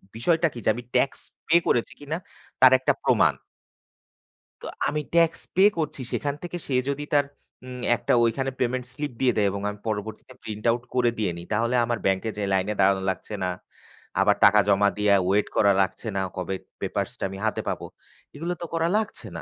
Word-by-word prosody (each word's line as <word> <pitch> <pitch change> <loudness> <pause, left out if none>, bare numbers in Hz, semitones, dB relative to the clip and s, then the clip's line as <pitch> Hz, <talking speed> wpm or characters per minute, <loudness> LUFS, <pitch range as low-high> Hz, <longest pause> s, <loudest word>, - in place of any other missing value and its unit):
বিষয়টা 165 +8 +2
কী? 120 - -7
যে, - - +4
আমি 120 - -6
ট্যাক্স 130 +2 +2 0.3
পে 160 - +4
করেছি 120 - +1
কিনা 145 +3 -4 0.4
তার 130 -1 +9
একটা 130 - +2
প্রমাণ। - - +4 1.3
তো - - -9 0.2
আমি 150 - -1
ট্যাক্স 165 -1 +3
পে 190 - +5
করছি। 155 -4 -3
সেখান 145 -1 -1
থেকে 175 0 -5
সে 135 - -3 0.2
যদি 140 +1 -2
তার 145 -1 +4 0.4
উম 125 0 -8 0.2
একটা - - 0
ওইখানে 130 +4 0
পেমেন্ট 125 0 -1
স্লিপ 145 +1 -4
দিয়ে 125 -2 +3
দেয়, 105 -2 +3
এবং 100 +1 -4
আমি 105 0 -8
পরবর্তীতে 110 +3 -5
প্রিন্ট 105 -1 -6
আউট 120 +1 -2
করে 125 -1 +3
দিয়ে 105 -5 0
নিই, 85 - -9
তাহলে 115 +3 +1
আমার 120 0 -1
ব্যাংকে 95 +3 +1
যেয়ে 100 -2 -2
লাইনে 95 +2 +1
দাঁড়ানো 95 0 +4
লাগছে 95 - -5
না। 90 - 0 0.7
আবার - - +4
টাকা 105 +1 +7
জমা 100 0 +4
দিয়ে 105 -1 +3
ওয়েট 100 +2 +2
করা 100 -2 +5
লাগছে 95 +4 -2
না, 95 - +1
কবে 95 +1 -3 0.3
পেপারসটা - - -3
আমি 95 - -7
হাতে 110 - 0
পাবো। - - -4 0.5
এগুলো 170 +4 -3
তো - - -3
করা 165 0 +1
লাগছে 220 0 -4
না। - - -6
120 Hz, 190 wpm, -25 LUFS, 100-145 Hz, 1.3 s, তার